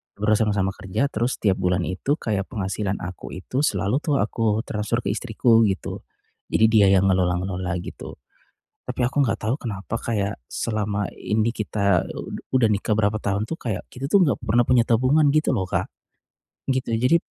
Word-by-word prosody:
Ber 105 +1 0
sama-sama 105 -3 +1
kerja 95 +9 -1
terus 120 +4 0
setiap 100 -3 +2
bulan 90 0 +1
itu 135 +11 -1
kayak 100 -3 -2
penghasilan 100 -1 -2
aku 90 -1 -7
itu 125 +8 -4
selalu 110 -1 +1
tuh 150 - +1
aku 110 0 0
transfer 105 +2 -1
ke 100 - 0
istriku, 115 0 +3
gitu. 95 -1 -4 0.5
Jadi 110 - +4
dia 105 -3 +6
yang 95 - +2
ngelola-ngelola 90 0 0
gitu. - - -8 0.7
Tapi - - -4
aku 135 +3 +2
enggak 115 - -2
tahu 110 +5 0
kenapa 110 -2 -4
kayak, 105 -4 -2
selama 105 - -2
ini 110 +2 0
kita, 100 -5 0 0.5
udah 130 -3 +4
nikah 105 +1 0
berapa 105 0 +1
tahun 105 +1 -2
tuh 165 - -3
kayak, 110 -5 -4
kita 130 +2 -6
tuh 190 +7 +4
enggak 140 - +3
pernah 120 +3 +3
punya 120 -2 +5
tabungan 130 +7 +3
gitu 155 0 +2
loh 95 - -1
Kak, 90 - -2 0.8
gitu. 130 -3 0
Jadi, 125 +8 +4
110 Hz, 170 wpm, -23 LUFS, 100-120 Hz, 0.8 s, dia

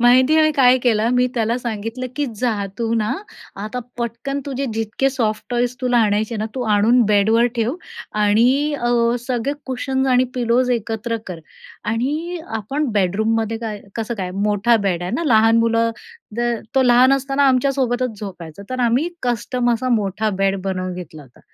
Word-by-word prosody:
माहिती 255 +4 +5
आहे 315 - +5
आम्ही 310 0 +4
काय 255 -2 +5
केलं, 230 -2 +2
मी 250 0 +3
त्याला 230 0 0
सांगितलं 230 +2 -4
की 290 - 0
जा 215 -4 -1
तू 230 -1 -1
ना, 215 -1 0 0.5
आता 225 +4 -4 0.2
पटकन 235 +4 -3
तुझे 275 0 -3
जितके 225 +5 0
सॉफ्टटॉयज 240 0 -1
तुला 245 -1 +2
आणायचे 215 +1 +1
ना, 215 +1 -2
तू 255 - -2
आणून 230 +5 +4
बेडवर 220 +3 +3
ठेव. 235 +5 0 0.4
आणि 240 +8 +2
अ, 240 0 0 0.4
सगळे 255 +2 -1
कुशन्स 265 +1 -1
आणि 255 0 +4
पिलोज 245 +1 +1
एकत्र 230 0 -2
कर. 175 -3 -7 0.4
आणि 295 +11 -2 0.2
आपण 275 +8 -2
बेडरूममध्ये 220 +3 0
काय 210 -2 -4 0.2
कसं 230 +1 -3
काय 180 -1 -3 0.2
मोठा 210 +3 +3
बेड 175 -2 0
आहे 180 - -3
ना, 335 - -1
लहान 225 -3 +4
मुलं 230 0 +2 0.5
द - - -1 0.3
तो 265 - +4
लहान 250 +2 +5
असताना 275 +1 +1
आमच्यासोबतच 255 -3 0
झोपायचा, 180 -3 -8
तर 255 0 -2
आम्ही 245 +8 +2
कस्टम 245 0 0
असा 255 +2 -3
मोठा 210 +2 -1
बेड 195 -1 +1
बनवून 185 -1 -3
घेतला 155 -4 -9
होता. 125 -3 -20
235 Hz, 165 wpm, -20 LUFS, 215-255 Hz, 0.5 s, माहिती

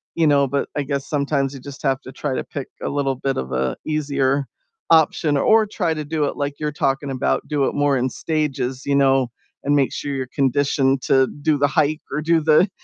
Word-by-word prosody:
you 165 - +2
know, 140 -1 +4
but 140 +2 -2
I 145 - 0
guess 140 0 -3
sometimes 140 -2 0
you 135 - -8
just 140 +2 -10
have 135 -1 +1
to 130 - -10
try 145 -3 -3
to - - -2
pick 140 -3 -6
a - - -3
little 140 -2 0
bit 135 +1 -2
of 65 0 -4
a 65 0 0
easier 140 -2 0 0.5
option 160 -1 +4
or 220 +8 +4
try 180 -5 -1
to 155 -1 -5
do 155 0 -1
it - - -3
like 145 0 -2
you're 150 -1 -2
talking 135 -1 -1
about, 130 - 0
do 145 -3 +1
it - - -2
more 145 -1 +2
in 130 +1 0
stages, 135 -4 -2
you 140 - +1
know, 135 -2 +3 0.4
and 145 - +3
make 140 -2 +2
sure 145 - -4
you're 130 -1 -3
conditioned 135 -1 +2
to 135 -1 +4
do 150 0 +2
the 145 0 +3
hike 155 0 +1
or 150 +2 -1
do 165 +1 +3
the, 155 +5 +4
140 Hz, 225 wpm, -21 LUFS, 135-150 Hz, 0.5 s, know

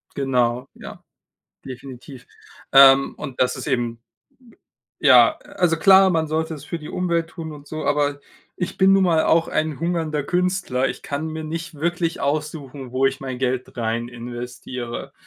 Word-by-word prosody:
Genau, 125 -2 0
ja, - - -11 0.6
definitiv. 130 0 -10 0.4
Ähm, 135 0 +7
und 130 - -8
das 125 - +2
ist - - -7
eben 120 -4 -1 1.0
ja, - - +6
also, 165 -2 0
klar, 190 +2 +6
man 160 -2 0
sollte 160 +1 -2
es 145 - -10
für 165 +1 -5
die 150 - -10
Umwelt 170 -2 -1
tun 160 -3 -8
und 145 -1 -12
so, 155 0 -6
aber 145 0 0 0.4
ich 185 +1 -4
bin 190 0 +5
nun 195 -1 +4
mal 165 -3 +3
auch 165 0 +3
ein 155 -1 -2
hungernder 165 -3 -1
Künstler. 180 -6 0
Ich - - -7
kann 145 +3 -4
mir 160 0 -5
nicht 165 +1 -5
wirklich 170 +2 -2
aussuchen, 140 -3 -4
wo 135 +1 +2
ich 135 +1 -1
mein 130 -2 -5
Geld 130 -1 -2
reininvestiere. 120 +1 -5
145 Hz, 155 wpm, -22 LUFS, 130-165 Hz, 1.0 s, Ähm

